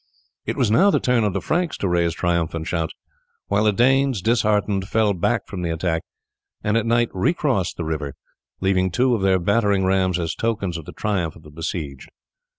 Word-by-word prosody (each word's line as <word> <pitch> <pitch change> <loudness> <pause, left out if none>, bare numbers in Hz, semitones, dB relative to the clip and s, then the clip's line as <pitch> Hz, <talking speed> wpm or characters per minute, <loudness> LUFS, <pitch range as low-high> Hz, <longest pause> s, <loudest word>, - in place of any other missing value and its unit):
It - - -2
was 115 -5 +2
now 190 - +5
the - - +3
turn 125 -2 +2
of 105 -3 0
the 95 - -2
Franks 170 - -1
to 100 - -1
raise 85 -2 +1
triumphant 85 -2 -1
shouts, 80 -1 -2 0.5
while 100 +2 +2
the 105 - +5
Danes, 130 -1 +2
disheartened, 105 -4 +1
fell 110 -1 +2
back 115 +6 0
from 95 -3 -6
the 85 - -2
attack, 80 0 -1 0.6
and 105 +1 +1
at 115 0 +1
night 120 0 +2
recrossed 105 - 0
the 85 - -3
river, 75 -3 -3 0.5
leaving 95 -1 +2
two 125 +7 +2
of 110 - 0
their 95 -1 +3
battering 100 +1 +2
rams 95 -1 +2
as 85 -2 -2
tokens 100 -6 -2
of 80 -2 -6
the - - -8
triumph 95 -7 -2
of 80 - -15
the 75 - -13
besieged. 75 -3 -5
95 Hz, 195 wpm, -22 LUFS, 85-115 Hz, 0.6 s, now